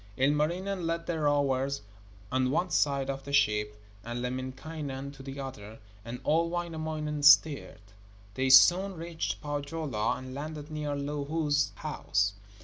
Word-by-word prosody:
Ilmarinen 165 +7 +1
led 165 0 -2
the 165 -2 -2
rowers 140 -3 +1 0.5
on 130 0 +2
one 170 +5 0
side 140 -3 +2
of 135 0 -4
the 140 - -7
ship, 105 -6 +2 0.2
and 120 +1 -4
Lemminkainen 135 +2 -5
on 135 -1 -12
the 135 0 -7
other, 110 -5 -7 0.3
and 120 +2 -6
old 165 +2 +2
Wainamoinen 155 -3 -3
steered. 145 -5 +5 0.5
They 130 +3 0
soon 180 +9 +7
reached 165 0 -4
Pohjola 145 -5 -2
and 130 0 -8
landed 150 +2 -6
near 150 -1 -2
Louhi's 145 +1 0
house. 100 0 -1
145 Hz, 135 wpm, -29 LUFS, 130-155 Hz, 0.5 s, soon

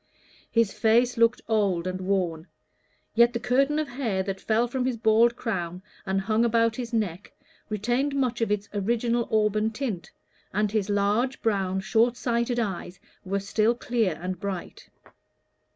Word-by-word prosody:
His 230 -3 +2
face 240 +2 +3
looked 230 +1 +3
old 200 -6 +1
and 185 0 -3
worn, 180 -3 -1 0.7
yet 235 +1 +5
the 235 - -1
curtain 275 +5 +2
of 310 -1 0
hair 235 -8 -2
that 195 0 -4
fell 230 +2 +1
from 255 +1 -2
his 255 -2 -1
bald 230 +1 +4
crown 180 -7 -4 0.2
and 190 0 +1
hung 220 +3 +1
about 230 -1 +2
his 240 -1 -5
neck 205 -5 -2 0.4
retained 240 +7 0
much 250 -4 0
of 225 - +1
its 205 -1 -1
original 230 +3 0
auburn 215 0 +2
tint, 220 - -4 0.5
and 210 0 +1
his 210 -2 0
large, 205 +6 +1
brown, 190 -3 0
short 230 +4 +2
sighted 240 0 0
eyes 190 -4 -4 0.2
were 195 +1 -1
still 215 +4 +1
clear 230 -7 0
and 180 0 -4
bright. 195 -3 -6
220 Hz, 155 wpm, -26 LUFS, 195-235 Hz, 0.7 s, yet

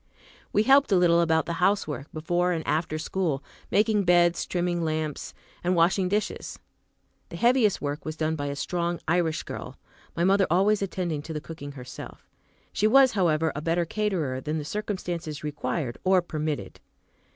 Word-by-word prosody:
We 210 - +3
helped 270 +1 +5
a - - +5
little 170 -1 +4
about 160 -1 +2
the 170 - -3
housework, 155 -8 0
before 175 +3 0
and 160 -2 -3
after 155 0 -1
school, 155 -3 -2 0.3
making 210 0 +3
beds, 175 -1 +3
trimming 175 -1 -1
lamps, 155 -2 -3 0.3
and 180 +1 +1
washing 180 +2 +3
dishes. 210 +2 -2 0.7
The - - -8
heaviest 235 -6 +3
work 145 +1 -3
was 155 0 -5
done 160 0 0
by 145 -2 -3
a 140 - -3
strong 170 +3 -2
Irish 165 -1 +1
girl, - - -7 0.4
my 170 - 0
mother 195 +1 +4
always 195 +5 +3
attending 180 -5 -2
to 160 +2 -7
the 150 - -3
cooking 145 -2 -9
herself. 125 -2 -10 0.5
She 215 - +2
was, 265 +2 +6
however, 165 -5 +1
a 145 - -3
better 170 +2 0
caterer 170 -10 -1
than 155 +3 -2
the 150 - -4
circumstances 175 -5 -4
required 145 -3 -3
or 185 -1 +4
permitted. 155 -3 -4
170 Hz, 165 wpm, -26 LUFS, 155-190 Hz, 0.7 s, was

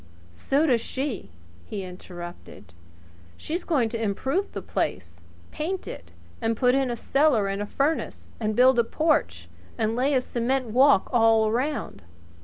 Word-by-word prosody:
"So 270 - +1
does 245 -7 +3
she," 265 -3 -4 0.3
he 200 - -6
interrupted. 175 - -10 0.6
"She's 340 +4 -4
going 275 -9 +1
to 230 0 -4
improve 265 - -1
the - - -5
place 85 -2 -3 0.3
paint 360 +5 -4
it, 85 0 -9 0.3
and 225 0 0
put 250 +1 +3
in 270 -1 +1
a 240 - -1
cellar 275 -4 +2
and 195 +1 -2
a 205 - -3
furnace, 290 +8 -2
and 215 -1 -1
build 255 +1 +5
a - - +5
porch, 310 +6 0 0.3
and 225 -1 0
lay 270 +3 +1
a 255 - +3
cement 250 +2 -1
walk 260 -3 +4
all 225 -2 +4
round." 260 - -2
240 Hz, 155 wpm, -25 LUFS, 210-275 Hz, 0.6 s, build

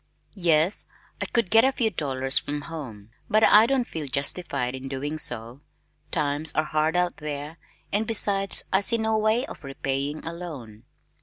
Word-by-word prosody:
"Yes, 170 -1 +3 0.3
I - - -2
could 230 -6 -1
get 225 +1 +6
a 265 - +3
few 230 -4 -1
dollars 135 -5 +3
from 145 0 -5
home, 125 -10 -10 0.2
but 215 +1 +2
I 215 +1 +6
don't 260 -2 0
feel 155 -3 -6
justified 140 -1 -3
in 130 0 -7
doing 145 +3 -5
so, 120 +2 -1 0.5
times 150 0 +2
are 155 - +1
hard 155 +2 -1
out 180 0 -1
there 150 +1 -7 0.3
and 215 +2 0
besides 200 -3 +5
I 190 - +4
see 230 +3 +3
no 220 0 -1
way 220 +4 +1
of - - -12
repaying 135 +2 -4
a 165 - -5
loan." 130 -11 -10
155 Hz, 170 wpm, -24 LUFS, 140-200 Hz, 0.5 s, get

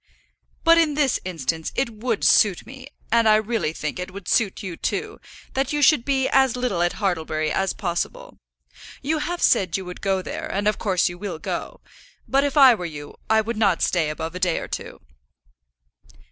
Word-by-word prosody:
"But 335 0 +6
in 310 -3 +2
this 285 -4 +1
instance 160 -2 -3
it 255 -3 0
would 225 0 -3
suit 200 -5 +4
me, 260 0 -11 0.2
and 230 -1 +4
I 215 - +6
really 215 -7 0
think 155 +2 -5
it 180 - -4
would 190 0 -10
suit 215 -2 +1
you 185 -3 -5
too, 420 - -3 0.3
that 270 0 -1
you 295 0 +1
should 275 -5 +5
be 270 -2 +1
as 265 -3 +3
little 245 -8 -1
at 175 0 +1
Hartlebury 160 -6 -1
as 190 +4 0
possible. 190 - -4 0.6
You 310 +3 0
have 345 +3 -3
said 190 -7 +3
you 190 - -7
would 180 0 -9
go 190 -1 0
there, - - -5
and 205 +2 -1
of 210 - +1
course 190 -4 +1
you 175 -1 -6
will 195 -4 -5
go. - - -5 0.5
But 275 +1 +2
if 285 0 -1
I 265 -3 +9
were 205 - -5
you, 145 -2 -9 0.2
I 220 0 +4
would 225 +1 -4
not 200 -5 +2
stay 165 -4 +1
above 160 +2 -5
a 180 - -6
day 180 -2 +1
or - - -5
two." - - -7
205 Hz, 200 wpm, -23 LUFS, 175-265 Hz, 0.6 s, I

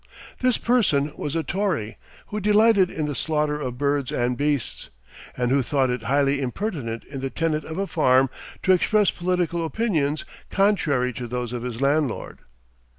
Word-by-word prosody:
This 255 -2 +2
person 165 - +2
was 150 +2 -4
a 165 - 0
Tory, 175 - -2 0.3
who 210 - -3
delighted 210 -2 +4
in 155 - -3
the 150 - -2
slaughter 150 0 -1
of 125 -3 -4
birds 140 -1 0
and 125 +1 0
beasts, 145 -2 -2 0.5
and 125 0 0
who 140 +1 +4
thought 130 0 +1
it 125 -1 -2
highly 140 +3 +1
impertinent 130 - -3
in 135 -2 -8
the 135 - -2
tenant 155 +1 -1
of 160 - -6
a 195 - 0
farm 135 -7 +3 0.4
to 190 - +4
express 205 +2 +3
political 175 -1 -1
opinions 160 -6 0 0.2
contrary 150 -11 +2
to 120 +1 -5
those 125 0 -4
of 120 - -3
his 120 0 -5
landlord. 140 -2 0
150 Hz, 165 wpm, -24 LUFS, 130-180 Hz, 0.5 s, delighted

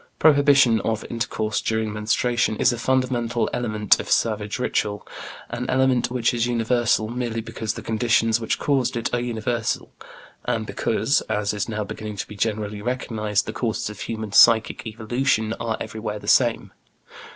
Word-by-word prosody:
Prohibition 140 -6 +5
of 110 +1 -2
intercourse 115 -1 -2
during 110 -1 -1
menstruation 110 +2 0
is 125 - +3
a 120 - -5
fundamental 125 -2 0
element 110 -4 +2
of - - -6
savage 105 -2 0
ritual, 105 -4 -2 0.4
an 125 - -4
element 130 -1 +2
which 125 0 0
is 120 0 0
universal 120 -2 +1
merely 120 -1 -3
because 110 -1 -4
the - - -7
conditions 115 0 +2
which 115 - -1
caused 135 -4 0
it 120 +1 -3
are 120 - +2
universal, 120 -1 -2 0.5
and - - -1
because - - 0
as 105 0 0
is 105 +1 -3
now 105 -1 -2
beginning 105 +1 -6
to 100 - -5
be 105 - -10
generally 105 0 -2
recognized 110 -3 -1
the - - -5
causes 110 -3 -2
of 105 - -12
human 110 -2 -5
psychic 115 +2 +5
evolution 110 0 0
are 115 -1 -2
everywhere 110 -1 -5
the - - -11
same. - - +2
115 Hz, 160 wpm, -23 LUFS, 110-120 Hz, 0.5 s, Prohibition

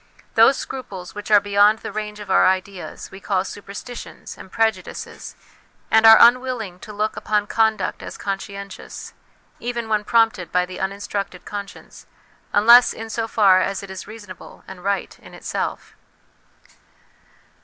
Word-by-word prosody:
Those 230 +5 +6
scruples 195 -9 -7
which 205 +1 -8
are 210 -1 +7
beyond 205 +1 +4
the - - -7
range 210 0 -5
of 205 -2 -7
our - - +5
ideas 190 0 -3
we 190 - -10
call 190 -1 -1
superstitions 205 +5 -9
and 190 - -13
prejudices, 220 -5 -3 0.6
and 220 0 +6
are 225 0 +10
unwilling 240 -6 +3
to 215 - -10
look 210 +1 -2
upon 210 -1 0
conduct 220 0 0
as - - -8
conscientious, 200 0 -7 0.5
even 235 -1 -4
when 215 -1 +1
prompted 225 -4 +2
by 180 0 +2
the 180 0 -9
unin 195 +1 -2
structed 195 -3 -4
conscience, 205 -1 -9 0.4
unless 235 +4 +7
in 225 0 -8
so 225 0 -2
far 195 -4 +4
as 195 +1 -2
it 195 - -9
is 190 0 -8
reasonable 205 -4 -12
and 185 -2 -11
right 200 -1 -2
in - - -14
itself. - - -4
205 Hz, 150 wpm, -21 LUFS, 190-225 Hz, 0.6 s, are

